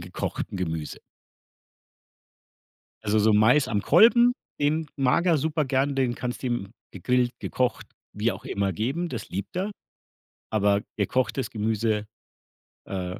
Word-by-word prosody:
gekochtem 90 +2 -5
Gemüse. 80 -4 -4 2.0
Also, 105 +1 +2
so 110 +1 +4
Mais 125 +7 +4
am 105 -3 0
Kolben, 235 - +6 0.3
den 155 +2 +1
mag 135 +6 +2
er 170 - +4
super 155 +1 0
gern, 135 +1 0
den 130 -3 +1
kannst 125 +1 -5
du - - -2
ihm 115 -4 -3 0.2
gegrillt, 125 -1 +1
gekocht, 125 -3 -1 0.3
wie - - 0
auch - - -10
immer, 100 -1 -1
geben, 135 - -2
das 115 -7 -6
liebt 100 +2 -5
er. 195 +3 -1 0.8
Aber 100 -1 +2 0.2
gekochtes 120 +4 0
Gemüse, 110 -1 -1 0.8
äh 90 -2 -4
120 Hz, 130 wpm, -26 LUFS, 105-140 Hz, 2.0 s, Kolben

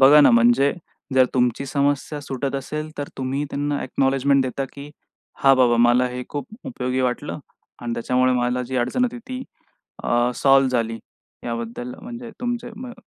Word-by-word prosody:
बघा 145 +3 +8
ना, 140 - +7
म्हणजे 120 +4 +4 0.4
जर 130 -1 +6
तुमची 125 +2 +1
समस्या 145 +1 0
सुटत 135 0 -4
असेल, 150 +3 -5
तर 145 - -3
तुम्ही 135 +3 -1
त्यांना 145 +1 -1
अ‍ॅक्नॉलेजमेंट 135 +1 +2
देता, 130 +1 -2
की 140 +1 -10 0.5
"हा 135 0 +7
बाबा, 125 -2 +4
मला 120 +2 +4
हे 125 0 -5
खूप 145 -2 -5 0.2
उपयोगी 130 - -2
वाटलं 125 +4 -2 0.4
आणि 120 - -3
त्याच्यामुळे 125 +2 +2
मला 125 0 0
जी 130 +1 -4
अडचण 125 - +1
होती 245 0 -3
ती 255 0 -4 0.6
अ, 120 +1 +2
सॉल्व्ह 135 -1 +4
झाली." 115 -2 -1 0.5
याबद्दल 115 +1 -5
म्हणजे 240 +1 -8
तुमचे 240 -1 -3
म 250 +1 -7
130 Hz, 160 wpm, -22 LUFS, 125-145 Hz, 0.6 s, बघा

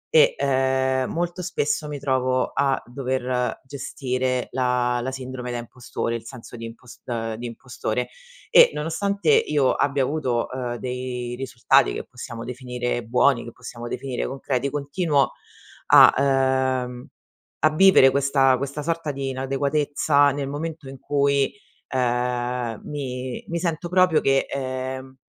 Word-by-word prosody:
E, 485 +1 +6
ehm, 130 -1 +1
molto 175 +2 -2
spesso 150 -4 -1
mi 150 - -5
trovo 130 -2 0
a 135 -1 +1
dover 125 -1 -2
gestire 130 -1 -2
la 125 -1 +1
la 130 - -2
sindrome 130 -1 -6
da 120 - -3
impostore, 120 0 -4
il 115 - -5
senso 120 0 -10
di 115 - -7
impos 115 +2 -12
ehm, 115 -2 -3
di 120 +1 -5
impostore, 120 0 -4 0.4
e - - +8
nonostante 200 - -1
io 150 - +3
abbia 140 -1 +1
avuto, 130 -5 -1
uhm, 125 -2 -3
dei 125 -1 -4
risultati, 120 - +2
che - - -4
possiamo 120 -2 -8
definire 125 -1 -3
buoni, 125 +2 +3
che 120 - -8
possiamo 120 0 -9
definire 125 +1 -3
concreti, 135 0 -2
continuo 145 -1 0 0.6
a, - - +8 0.7
ehm, 125 +2 -8 0.5
a 155 - +4
vivere 190 -6 +7
questa 135 -1 +3
questa 140 +3 -4
sorta 165 -1 -2
di 135 -1 -4
inadeguatezza, 140 +2 +1
nel 140 0 -3
momento 155 0 -5
in 135 - -9
cui, 140 -1 +1 0.4
ehm, 125 -2 -1
mi 130 -3 -5
mi 170 - -2
sento 170 0 -2
proprio 180 -3 +4
che, 135 0 +2
ehm, 130 0 -4
130 Hz, 135 wpm, -23 LUFS, 125-145 Hz, 0.7 s, e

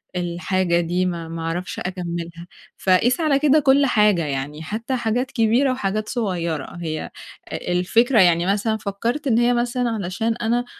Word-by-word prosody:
الحاجة 175 0 0
دي، 175 +2 0
ما 170 -2 -3
ما 165 0 -6
أعرفش 165 +3 -4
أكمّلها. 170 -2 -5 0.3
فقيس 195 - +2
على 300 -4 +2
كده 300 +1 +4
كل 280 0 +4
حاجة، 210 - +3
يعني 145 +2 -4
حتّى 230 +9 -3
حاجات 245 +2 -1
كبيرة 240 +3 +2
وحاجات 215 -3 -2
صغيّرة. 175 - -3
هي 155 -2 -4 0.4
أ - - -5
الفكرة 225 +7 +3
يعني 175 -1 +4
مثلًا 210 +3 0
فكّرت 230 +9 -3
إن 230 -3 +3
هي 240 +1 +3
مثلًا 240 0 0
علشان 220 +1 -2
أنا 240 +1 0
200 Hz, 155 wpm, -22 LUFS, 175-240 Hz, 0.4 s, كده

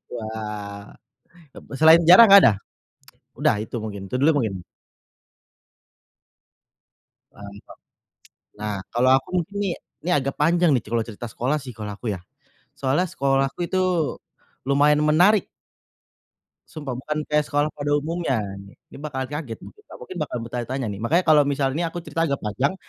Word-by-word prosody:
Wah. 105 -3 -7 0.6
B - - -14
selain 160 +1 +7
sejarah 180 +7 +9
enggak 200 0 +10
ada? 105 - +6 0.8
udah 145 -8 +1
itu 110 - -6
mungkin, 100 -3 -6
itu 125 - -5
dulu 145 +2 +3
mungkin. 110 -6 -2 2.8
Mantap. 100 0 -12 0.9
Nah 105 -1 -3 0.2
kalo 125 +2 +3
aku - - -16
mungkin 200 +5 -12
ini, 195 - -1 0.3
ini 180 - -1
agak 140 -2 -1
panjang 170 +2 +3
nih 125 - +1
kalo 115 +1 -1
cerita 115 +1 -8
sekolah 130 +7 -1
sih 130 - -8
kalo 105 -2 -6
aku 105 0 -4
ya, 90 - -8 0.6
soalnya 140 +7 +1
sekolahku 135 -2 -1
itu 185 +1 -1 0.9
lumayan 145 +2 +3
menarik. 180 +6 +4 1.2
Sumpah, 135 -5 -6
bukan 150 +3 -3
kaya 150 0 +3
sekolah 145 +1 0
pada 145 0 -2
umumnya. 150 -5 -1 0.2
Ni 100 0 -13 0.2
Ini - - -12
bakal 135 -3 -5
kaget 145 -7 -5
mungkin, 420 - -13
dan - - -13
mungkin 390 -6 -9
bakal - - -3
bertanya-tanya 125 +2 -4
nih, 100 - -6
makanya 160 +11 +2
kalau 150 -1 +7
misalnya 140 +3 -1
aku 175 - -5
cerita 165 -1 -1
agak 140 -2 -3
panjang, 130 - -1
140 Hz, 150 wpm, -23 LUFS, 115-155 Hz, 2.8 s, enggak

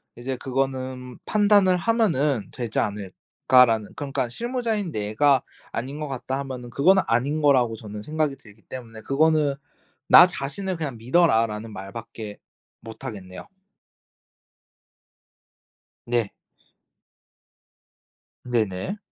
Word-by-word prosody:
이제 130 +2 -4
그거는 130 -1 -3
판단을 205 -3 +4
하면은 165 - +1
되지 120 -4 -5
않을까.'라는 105 +3 +2
그러니까 135 -3 -2
'실무자인 225 - -2
내가 125 +5 +2 0.3
아닌 135 +5 -5
것 150 - -3
같다.' 130 0 -4
하면은 130 -3 -6
그건 165 +10 +4
아닌 140 +7 +1
거라고 130 -6 +3
저는 105 -1 -8
생각이 155 -1 -1
들기 110 -4 -18
때문에 115 -3 -9
그거는 150 +2 +2 0.5
"나 175 - +9
자신을 180 +4 -4
그냥 145 -7 -4
믿어라."라는 115 -5 +2
말밖에 105 +2 -8 0.4
못 110 -1 -10
하겠네요. 95 -4 -8 2.6
네. 120 -4 0 2.1
네네. 115 - -1
130 Hz, 245 characters per minute, -24 LUFS, 115-150 Hz, 2.6 s, 나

